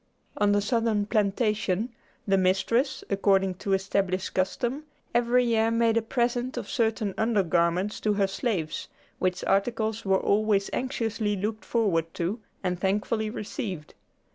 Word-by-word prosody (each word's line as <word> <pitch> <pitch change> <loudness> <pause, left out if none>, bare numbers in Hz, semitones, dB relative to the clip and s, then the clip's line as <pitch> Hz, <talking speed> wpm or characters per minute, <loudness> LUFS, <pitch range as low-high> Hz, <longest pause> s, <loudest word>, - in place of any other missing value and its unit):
On 205 -1 +2
the 205 0 +3
Southern 225 -2 +1
plantation, 210 0 0 0.4
the 195 - +4
mistress, 195 +8 +1
according 195 -1 +3
to 195 - 0
established 190 -1 0
custom, 240 +10 -1 0.3
every 240 +1 +3
year 225 -1 +2
made 230 0 +2
a 230 - +3
present 245 +2 -1
of - - -4
certain 220 -4 0
under 220 -3 +2
garments 175 +4 +1
to 210 - +1
her 200 -1 +2
slaves, 190 - -2 0.3
which 185 0 0
articles 220 +2 0
were 190 -1 +3
always 205 -1 +2
anxiously 225 -5 -1
looked 215 +3 -3
forward 170 -8 +1
to, 180 +7 -2 0.2
and 180 -1 -1
thankfully 210 +3 0
received. 195 -6 -5
210 Hz, 140 wpm, -27 LUFS, 190-230 Hz, 0.4 s, the